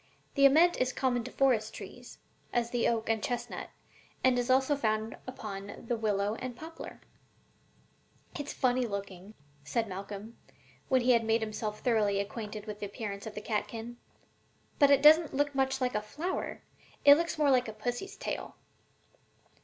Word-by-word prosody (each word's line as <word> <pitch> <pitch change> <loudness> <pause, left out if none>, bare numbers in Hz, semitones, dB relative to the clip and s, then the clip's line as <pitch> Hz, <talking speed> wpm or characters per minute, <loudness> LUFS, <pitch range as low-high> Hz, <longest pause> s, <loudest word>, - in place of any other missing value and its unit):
The 275 -1 +7
ament 330 +6 +5
is 255 0 +1
common 245 -3 0
to 255 - -7
forest 235 -5 +2
trees, - - -10 0.3
as 235 -1 0
the 240 -1 +1
oak 230 -1 0
and 225 -1 +1
chestnut, 245 +2 -4 0.5
and 255 -1 +4
is 245 +1 -2
also 265 +3 +4
found 220 -4 -1
upon 205 -5 -7
the 240 - +1
willow 210 -2 0
and 245 +1 -5
poplar.'" 320 +5 -9 1.3
"It's 290 0 -5
funny 255 -1 +1
looking," 200 0 -6 0.3
said 225 +11 -1
Malcolm, 200 +3 -7 0.5
when 260 -1 +4
he 250 +1 +4
had 235 -2 +4
made 225 +1 +2
himself 215 -1 -4
thoroughly 210 -5 +2
acquainted 210 +1 -5
with 210 -1 -7
the 205 - -3
appearance 200 0 -6
of 215 - -8
the 210 - -5
catkin, 225 +2 -3 0.8
"but 285 -2 +7
it 280 0 +5
doesn't 310 0 +7
look 290 +1 +1
much 265 -1 +1
like 250 -1 0
a 210 - 0
flower: 310 - -4 0.4
it 285 - +11
looks 335 +2 0
more 295 -2 +4
like 250 -2 +3
a - - -4
pussy's 245 - -4
tail." - - -5
235 Hz, 165 wpm, -31 LUFS, 215-265 Hz, 1.3 s, it